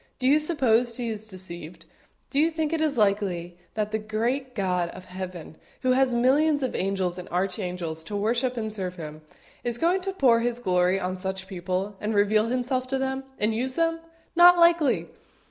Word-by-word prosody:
Do 255 - -4
you 290 +3 +5
suppose 245 -7 +2
He 240 -2 -2
is 220 -1 -5
deceived? 175 -4 -9 0.5
Do 280 - +1
you 320 +2 +4
think 320 -1 -2
it 320 - 0 0.2
likely 190 -5 0 0.2
that 215 -1 -1
the 220 - 0
great 235 +5 -2
God 180 -4 0
of 185 +1 -10
Heaven, 180 -3 -7 0.3
who 255 - +3
has 260 0 +3
millions 280 +5 +3
of 255 - -1
angels 185 -2 -1
and 180 - -9
archangels 180 -3 -3
to 205 - -5
worship 240 +5 0
and 220 -2 -3
serve 185 -3 -4
Him, 155 -2 -8 0.4
is 240 -1 -1
going 350 +6 +2
to 390 +1 -3
pour 250 -9 +4
His 240 0 -1
glory 180 -4 +2
on 185 0 -2
such 190 0 -4
people, 185 +2 -3
and 215 +1 -1
reveal 210 +2 +3
Himself 255 +1 -1
to 270 +1 -1
them, 265 0 -2
and 215 +1 +2
use 255 +3 -2
them? 330 0 +1 0.4
Not 350 +1 +8
likely! 335 -5 +4
220 Hz, 185 wpm, -26 LUFS, 185-260 Hz, 0.5 s, Not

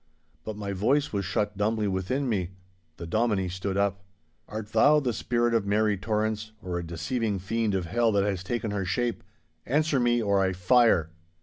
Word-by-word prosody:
But 110 -1 -6
my 100 -1 -4
voice 135 +10 +1
was 100 -2 -1
shut 105 +3 -1
dumbly 105 +1 0
within 100 +9 -1
me. 95 -5 -2 0.4
The 85 - -7
Dominie 105 0 0
stood 95 +2 -3
up. 100 -1 0 0.5
'Art 105 0 -6
thou 145 +7 +5
the 125 -5 -1
spirit 120 +1 0
of 110 -3 +1
Mary 105 +1 +2
Torrance, 110 +1 -2
or 90 -2 -4
a - - -5
deceiving 100 +6 -2
fiend 105 +2 -1
of 95 -2 -1
hell 115 +7 +1
that 100 -1 +3
has 100 -3 -1
taken 115 +1 -2
her 100 -1 -1
shape? 120 +7 -1 0.4
Answer 150 +1 +1
me, 120 -1 +2
or 100 -3 +2
I 95 -1 +1
fire! 90 -3 +3
105 Hz, 185 wpm, -27 LUFS, 95-115 Hz, 0.5 s, thou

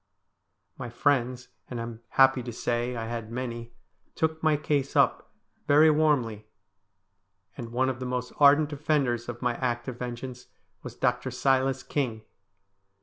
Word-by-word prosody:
My 120 - -5
friends, 125 0 0 0.2
and 120 - -5
I - - -3
am 115 -1 -8 0.2
happy 135 -1 +6
to 120 0 -6
say 120 +1 -2
I 115 -1 -4
had 115 -1 -5
many, 120 -1 -5 0.4
took 160 0 -1
my 155 -1 +3
case 145 -2 -1
up - - +2 0.4
very 155 +2 +6
warmly, 130 -9 +1 1.1
and 120 -3 -7
one 130 +2 +1
of 130 -2 -2
the 130 - -4
most 125 0 -3
ardent 145 +1 +6
defenders 140 -5 0
of 120 +1 -6
my 125 -1 +1
act 120 -1 -2
of 125 -2 -6
vengeance 125 0 -6 0.3
was - - -9
Dr. 125 +1 0
Silas 130 +1 +1
King. 120 -6 -2
125 Hz, 150 wpm, -27 LUFS, 120-140 Hz, 1.1 s, happy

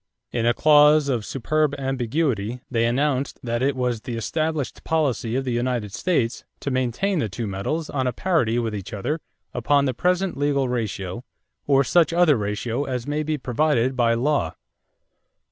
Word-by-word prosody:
In 115 -1 0
a 120 - +4
clause 150 -1 +5
of 120 -5 0
superb 150 +3 0
ambiguity 130 -3 -1
they 115 -1 +2
announced 135 +2 0
that 120 -1 -2
it 135 +1 +1
was 125 -3 -1
"the 120 - -5
established 155 +4 -2
policy 135 -8 0
of 135 0 -1
the 125 - -1
United 120 -4 -1
States 130 -11 0 0.2
to 140 - -2
maintain 130 - 0
the 110 - -1
two 100 +6 -4
metals 105 +12 -3
on 130 -2 -1
a - - +1
parity 150 -9 +1
with 115 -2 -1
each 100 -1 -6
other 130 +10 -2 0.3
upon 140 +4 +2
the 130 - 0
present 180 +7 0
legal 140 -2 +1
ratio 110 -4 -3 0.4
or 140 -1 +4
such 170 +4 +3
other 170 -4 +5
ratio 110 +5 -2
as 125 -2 -3
may 150 +1 -1
be 155 0 -1
provided 130 -1 +1
by 115 -2 +3
law." 145 +5 0
130 Hz, 170 wpm, -23 LUFS, 115-150 Hz, 0.4 s, clause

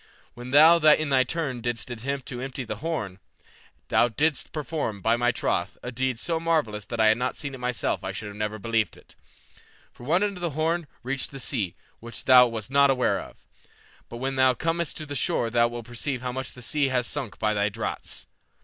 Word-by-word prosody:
When 120 +1 -9
thou 155 +5 +8
in 155 -1 +5
thy 130 -2 +4
turn 135 -3 -2
didst 120 +1 -3
attempt 130 +3 -4
to 125 -1 -5
empty 130 0 -4
the 110 -3 -5
horn, 110 - -4 0.7
thou - - +4
didst 145 +6 0
perform, 150 -8 -3
by 115 +4 +2
my 120 +1 +2
troth, 90 -5 -1
a 125 - -4
deed 130 0 -1
so 165 +6 -1
marvellous 150 -11 0
that 115 - -5
had 110 - +5
I - - +7
not 125 +3 -2
seen 140 -2 -5
it 130 - -8
myself 125 -1 -1
I 95 - -3
should 100 +1 -7
never 105 0 -2
have 110 - -11
believed 115 -2 0
it. - - -18 0.8
For - - -14
one 170 +9 +2
end 200 -2 -1
of - - -10
that 170 - 0
horn 160 +2 0 0.2
reached 135 +2 -2
the 135 - -9
sea, 110 - -1 0.2
which 115 +1 -7
thou 125 -1 +8
wast 115 +1 -6
not 140 0 +5
aware 130 -2 +2
of, - - -12 0.6
but 120 - -7
when 135 +2 -3
thou 130 -1 +5
comest 165 +4 -1
to 155 - -6
the 145 - -6
shore 120 -3 0
thou 120 0 +4
wilt 120 -1 -7
perceive 125 +2 -3
how 125 - -2
much 130 +1 -5
the 125 - -11
sea 145 +3 +1
has 125 -2 0
sunk 135 -6 -5
by 110 -1 +1
thy 100 0 +1
draughts. - - -5
125 Hz, 220 wpm, -26 LUFS, 115-145 Hz, 0.8 s, thou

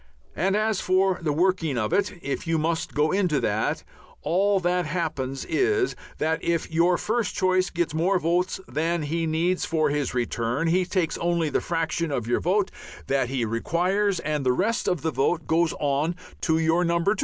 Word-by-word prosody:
And 195 +4 +1
as 215 -1 +1
for 185 0 +2
the 155 -3 0
working 165 -3 +1
of 110 -2 -1
it, 205 0 +1
if 140 +4 -3
you 165 0 +2
must 160 +1 -1
go 150 +1 +2
into 180 -7 +1
that, 110 -1 -1 0.4
all 195 +3 +2
that 180 -1 0
happens 145 -5 -3
is 395 -1 +1 0.2
that 160 +1 -1
if 170 -1 -1
your 170 +2 +3
first 230 +1 -1
choice 185 0 +2
gets 170 -3 -2
more 175 +5 +2
votes 180 +2 0
than 160 +5 -1
he 165 +2 -1
needs 170 +4 0
for 155 -3 +1
his 145 -3 -1
return, 120 +4 -1
he 180 +2 +2
takes 175 -3 -1
only 170 -2 +1
the - - 0
fraction 165 0 -1
of 125 -5 -2
your 120 - +1
vote 190 +3 +1 0.3
that 135 -2 0
he 130 -3 -1
requires, 180 - 0
and 150 -2 -2
the 125 -1 +3
rest 215 - 0
of 180 -5 0
the 160 - 0
vote 165 +4 0
goes 165 0 +2
on 145 +4 0 0.3
to 160 -2 +2
your 165 +2 +2
Number 170 +3 +2
2. 210 - -8
165 Hz, 190 wpm, -25 LUFS, 150-185 Hz, 0.4 s, your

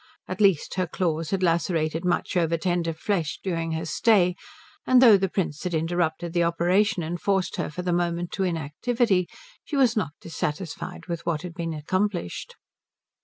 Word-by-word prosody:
At 185 +3 -4
least 195 -7 +3
her 185 -1 +1
claws 165 -2 -1
had 190 -1 -1
lacerated 165 -1 +1
much 180 +1 0
over 165 -1 +2
tender 175 0 0
flesh 165 -1 -2
during 165 -3 -2
her 160 +1 -3
stay; 180 +1 +3 0.5
and 255 -1 +6
though 235 -5 +8
the 195 -1 +1
Prince 165 -6 -2
had 180 -2 -1
interrupted 165 +1 -1
the 175 - +2
operation 175 +3 +2
and 170 +2 -4
forced 195 -2 0
her - - -2
for 180 +4 -6
the 180 -1 0
moment 175 0 -1
to 195 - -1
inactivity, 180 - 0 0.4
she 300 - -5
was 255 -4 +4
not 210 -9 -1
dissatisfied 170 +2 -5
with 170 -2 -4
what 165 -1 -1
had 180 -2 -6
been 165 -1 -4
accomplished. 185 - -2
175 Hz, 170 wpm, -25 LUFS, 165-190 Hz, 0.5 s, though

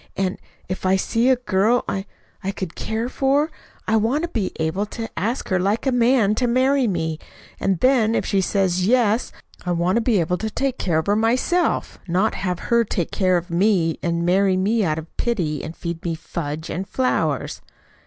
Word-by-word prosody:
And 190 -1 -1 0.3
if 185 - -4
I 185 0 +3
see 230 +6 +1
a 260 - +6
girl 235 0 +1
I 195 +1 -3 0.4
I 190 - -1
could 190 -3 -4
care 225 +2 -2
for, 280 +4 +1 0.4
I 220 - +3
want 240 +9 +1
to 345 - -2
be 220 - -2
able 170 +6 -1
to 225 +1 -5
ask 225 +9 -2
her 185 -2 +2
like 200 +7 0
a 265 - +2
man 240 -3 +3
to 245 - +3
marry 260 +2 +3
me; 160 -5 -2 0.4
and 190 -3 0
then 240 -4 +3
if - - 0
she 195 -2 +1
says 185 -1 +1
'yes,' 230 -1 +2 0.3
I 180 - -1
want 175 +4 +1
to - - +2
be 225 -3 +2
able 180 +2 0
to 220 - -2
take 265 +3 -2
care 170 -4 +1
of 160 - 0
her 205 - +2
myself 250 +11 +1
not 185 +5 +1
have 180 +1 -4
her 235 0 +5
take 180 -6 -2
care 185 -2 +2
of 175 +1 -5
me 175 -2 +2
and 170 0 -1
marry 190 +1 +3
me 210 +4 +2
out 155 -4 0
of 160 +1 -9
pity 170 - -1
and 160 - -7
feed 170 -1 -5
me 170 -2 -1
fudge 160 -1 -5
and 190 +3 -4
flowers! 255 +2 -1
195 Hz, 205 wpm, -22 LUFS, 175-235 Hz, 0.4 s, a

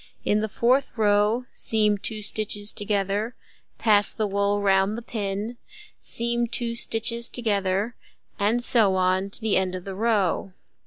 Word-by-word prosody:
In 210 +1 +1
the 220 - -3
fourth 255 +6 +1
row, 210 +3 +2
seam 210 -2 0
2 215 +1 -4
stitches 210 0 -2
together, 205 +2 -2 0.4
pass 205 -3 +3
the 215 - -2
wool 200 0 0
round 195 +1 +1
the 235 - -7
pin, 210 +1 -4 0.4
seam 235 0 -1
2 235 0 -2
together, 225 -3 0 0.4
and 220 +4 +1
so 215 -6 +7
on 185 +1 +1
to - - -1
the 220 -2 +1
end 185 -1 -1
of 180 - -7
the 195 - -6
row. 195 -3 0
210 Hz, 145 wpm, -24 LUFS, 200-230 Hz, 0.4 s, so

